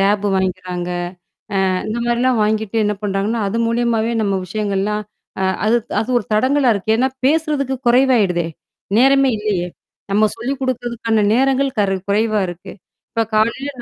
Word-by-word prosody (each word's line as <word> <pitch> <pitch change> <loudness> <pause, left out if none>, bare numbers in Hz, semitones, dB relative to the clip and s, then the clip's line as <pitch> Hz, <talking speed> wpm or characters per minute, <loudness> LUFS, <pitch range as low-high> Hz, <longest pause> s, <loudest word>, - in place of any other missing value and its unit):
Tape 200 +1 +2
வாங்கிக்கிறாங்க. 180 -1 -2 0.8
அ - - +2 0.2
இந்தமாரிலாம் 235 +2 0
வாங்கிட்டு 215 0 -1
என்ன 210 - 0
பண்றாங்கன்னா, 205 +3 -1
அது 220 - -3
மூலியமாவே 230 -1 +1
நம்ம 200 -2 0
விஷயங்கள்லாம் 210 +1 -1 0.4
அ - - 0 0.2
அது 230 +2 +4 0.2
அது 220 - -4
ஒரு 225 - -7
தடங்கலா 260 +2 +3
இருக்கு. 205 +2 -1
ஏன்னா, 260 +1 +2 0.2
பேசுறதுக்கு 290 -3 +1
குறைவாயிடுதே! 235 -9 +3 0.5
நேரமே 270 +1 +5
இல்லயே! 200 -4 -1 0.4
நம்ம 215 +1 +4
சொல்லிக் 260 +4 -4
குடுக்கிறதுக்கான 235 -4 -1
நேரங்கள் 270 0 +1
கரு 195 -1 +1
குறைவா 215 +1 +2
இருக்கு. 175 +2 -8 0.4
இப்ப 230 -1 0
காலையில 230 +6 +1
220 Hz, 135 wpm, -19 LUFS, 200-250 Hz, 0.8 s, நேரமே